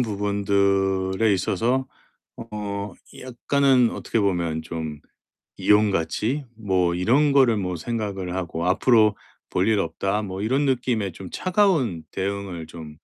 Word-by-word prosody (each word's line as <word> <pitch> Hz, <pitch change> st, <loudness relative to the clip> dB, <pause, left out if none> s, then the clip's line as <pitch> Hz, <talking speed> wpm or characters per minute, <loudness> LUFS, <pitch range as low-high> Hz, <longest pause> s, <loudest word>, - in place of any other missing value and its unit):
부분들에 100 Hz, -1 st, +1 dB
있어서 120 Hz, +8 st, 0 dB, 0.6 s
어 100 Hz, -2 st, -5 dB, 0.3 s
약간은 130 Hz, 0 st, +2 dB
어떻게 -, -, -2 dB
보면 85 Hz, -6 st, 0 dB
좀 80 Hz, -2 st, -6 dB, 0.6 s
이용 105 Hz, 0 st, +4 dB
가치 105 Hz, -, -1 dB
뭐 95 Hz, -5 st, +1 dB
이런 130 Hz, +12 st, +3 dB
거를 130 Hz, -5 st, +4 dB
뭐 90 Hz, -2 st, -2 dB
생각을 95 Hz, -1 st, -4 dB
하고 85 Hz, -2 st, -3 dB
'앞으로 110 Hz, +2 st, +4 dB, 0.4 s
볼 95 Hz, +4 st, +1 dB
일 110 Hz, -2 st, +3 dB
없다.' 100 Hz, +2 st, -1 dB
뭐 95 Hz, -2 st, -5 dB
이런 130 Hz, +7 st, +1 dB
느낌의 120 Hz, -7 st, 0 dB
좀 90 Hz, +2 st, -9 dB
차가운 175 Hz, -, +1 dB
대응을 95 Hz, -4 st, -4 dB
좀 80 Hz, -2 st, -10 dB
100 Hz, 245 characters per minute, -23 LUFS, 90-115 Hz, 0.6 s, 이용